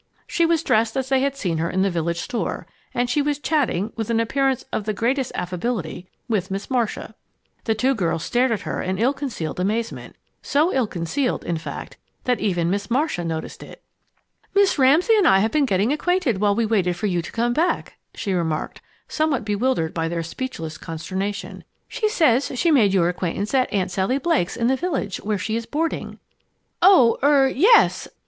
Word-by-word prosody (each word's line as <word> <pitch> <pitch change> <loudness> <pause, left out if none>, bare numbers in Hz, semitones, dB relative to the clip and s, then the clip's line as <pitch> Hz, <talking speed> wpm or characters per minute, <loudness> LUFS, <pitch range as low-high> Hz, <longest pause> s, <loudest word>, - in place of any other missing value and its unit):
_ - - -47 0.2
She 335 -1 +1
was 330 -1 +1
dressed 225 -1 +1
as 265 -1 -2
they 265 -1 +3
had 275 +1 0
seen 175 - -2
her 165 +1 -1
in 190 +1 +1
the 195 - +1
village 170 0 -1
store, 240 - -3 0.3
and 245 0 0
she 295 +4 +1
was 290 0 0
chatting, 270 - 0
with 225 -1 -4
an 230 -1 +2
appearance 270 +3 0
of 205 - -2
the 215 -1 -2
greatest 255 +4 0
affability, 180 -1 -3 0.2
with 205 -5 -1
Miss 195 +6 -5
Marcia. 240 -4 -1 0.5
The 220 - +1
two 255 +5 +2
girls 165 -8 -1
stared 245 +5 +1
at 220 - -1
her - - -3
in 185 +1 -2
ill 245 +7 +2
concealed 245 - -5
amazement 220 +5 -2 0.3
so 305 +6 +1
ill 260 -4 +1
concealed, 205 - -2
in 170 - -1
fact, 155 -3 -7 0.3
that 250 -1 0
even 175 -4 0
Miss 200 +3 -2
Marcia 260 - 0
noticed 160 -1 -5
it. - - -12 0.7
"Miss 400 -6 +3
Ramsay 310 - +5
and 390 -5 +4
I 190 - +6
have 215 +3 +1
been 300 -2 +2
getting 200 +5 +1
acquainted 320 - 0
while 205 -1 +3
we 230 +1 +1
waited 190 -5 +1
for 195 - -4
you 180 -4 0
to 165 - -9
come 240 +1 0
back," 330 +7 -1 0.2
she 200 -4 -2
remarked, 160 -4 -2 0.3
somewhat 305 -8 0
bewildered 210 -5 0
by 165 -1 -1
their 170 0 -2
speechless 165 -4 -6
consternation. 190 +5 -5 0.2
"She 430 - -1
says 285 - +2
she 330 +7 +2
made 225 -10 +4
your 170 -3 +3
acquaintance 180 +4 -3
at 260 -2 +2
Aunt 185 -2 -1
Sally 190 +8 0
Blake's 290 - 0
in 230 - 0
the 260 +3 +3
village, 265 - -2
where 210 0 -2
she 215 +3 -3
is 230 0 -3
boarding." 320 +5 -3 0.6
"Oh 345 -11 +6
er, 280 -1 +5
yes!" 430 - +4
230 Hz, 195 wpm, -22 LUFS, 185-270 Hz, 0.7 s, I